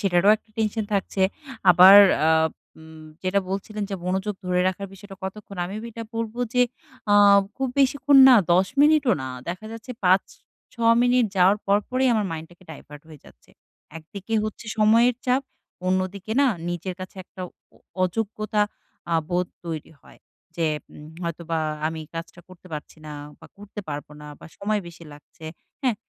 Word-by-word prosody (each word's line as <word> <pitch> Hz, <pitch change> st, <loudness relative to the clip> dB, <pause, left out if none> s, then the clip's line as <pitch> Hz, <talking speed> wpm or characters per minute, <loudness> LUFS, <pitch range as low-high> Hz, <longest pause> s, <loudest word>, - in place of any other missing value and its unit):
সেটারও 195 Hz, 0 st, +3 dB
একটা 220 Hz, -, -33 dB
টেনশন 220 Hz, 0 st, -1 dB
থাকছে। 195 Hz, -1 st, -1 dB, 0.5 s
আবার 185 Hz, +3 st, +9 dB, 0.3 s
আ -, -, +4 dB, 0.5 s
উম 160 Hz, 0 st, -13 dB, 0.2 s
যেটা 190 Hz, +1 st, +1 dB
বলছিলেন 205 Hz, +2 st, -4 dB
যে -, -, -2 dB
"মনোযোগ 190 Hz, +3 st, -2 dB
ধরে 180 Hz, 0 st, +1 dB
রাখার 195 Hz, +1 st, -4 dB
বিষয়টা 195 Hz, 0 st, -12 dB
কতক্ষণ?" 200 Hz, 0 st, -8 dB
আমি 200 Hz, +3 st, -6 dB
এটা 230 Hz, 0 st, -7 dB
বলবো 230 Hz, +1 st, -4 dB, 0.2 s
যে 250 Hz, -, +5 dB, 0.5 s
আ -, -, +6 dB, 0.4 s
খুব 265 Hz, -1 st, -1 dB
বেশিক্ষণ 275 Hz, +1 st, +3 dB
না 255 Hz, -, +8 dB, 0.2 s
১০ 185 Hz, +2 st, +4 dB
মিনিটও 295 Hz, -3 st, +4 dB
না। 130 Hz, -, -5 dB, 0.2 s
দেখা 185 Hz, +5 st, -5 dB
যাচ্ছে 230 Hz, +3 st, -9 dB
৫-৬ 230 Hz, +5 st, 0 dB
মিনিট। 245 Hz, -1 st, +3 dB
যাওয়ার 185 Hz, +3 st, +5 dB
পর, 200 Hz, +1 st, +4 dB
পরই 260 Hz, +1 st, +1 dB
আমার 215 Hz, -2 st, +1 dB
মাইন্ড 160 Hz, 0 st, -6 dB
টাকে 175 Hz, +1 st, -19 dB
ডাইভার্ট 150 Hz, -1 st, -12 dB
হয়ে 155 Hz, -3 st, -13 dB
যাচ্ছে। -, -, -20 dB, 0.5 s
একদিকে 200 Hz, +7 st, -7 dB
হচ্ছে 215 Hz, +1 st, -6 dB
সময়ের 230 Hz, +3 st, +4 dB
চাপ, 255 Hz, +2 st, +2 dB, 0.4 s
অন্যদিকে 185 Hz, +3 st, -1 dB
না 280 Hz, -, +5 dB, 0.2 s
নিজের 175 Hz, +1 st, -4 dB
কাছে 185 Hz, +1 st, -9 dB
একটা 185 Hz, -, -10 dB, 0.3 s
অ -, -, -22 dB, 0.2 s
অযোগ্যতা 215 Hz, +2 st, -1 dB, 0.5 s
আ -, -, +2 dB, 0.2 s
বোধ 180 Hz, 0 st, 0 dB, 0.2 s
তৈরি 160 Hz, -1 st, -6 dB
হয়। -, -, -19 dB, 0.4 s
যে 165 Hz, -1 st, 0 dB, 0.3 s
উম 150 Hz, -, -12 dB, 0.2 s
হয়তোবা 170 Hz, -1 st, -3 dB, 0.3 s
আমি 160 Hz, 0 st, -4 dB
কাজটা 165 Hz, +1 st, -7 dB
করতে 185 Hz, 0 st, -16 dB
পারছি 150 Hz, +1 st, -7 dB
না 150 Hz, -, -7 dB, 0.3 s
বা 160 Hz, -, -13 dB
করতে 205 Hz, +1 st, -9 dB
পারব 145 Hz, 0 st, -5 dB
না 150 Hz, -, -10 dB
বা -, -, -11 dB
সময় 210 Hz, +1 st, -1 dB
বেশি 170 Hz, 0 st, -13 dB
লাগছে। 150 Hz, +2 st, -16 dB, 0.4 s
হ্যাঁ? 250 Hz, -4 st, +2 dB
195 Hz, 165 wpm, -24 LUFS, 175-220 Hz, 0.5 s, আবার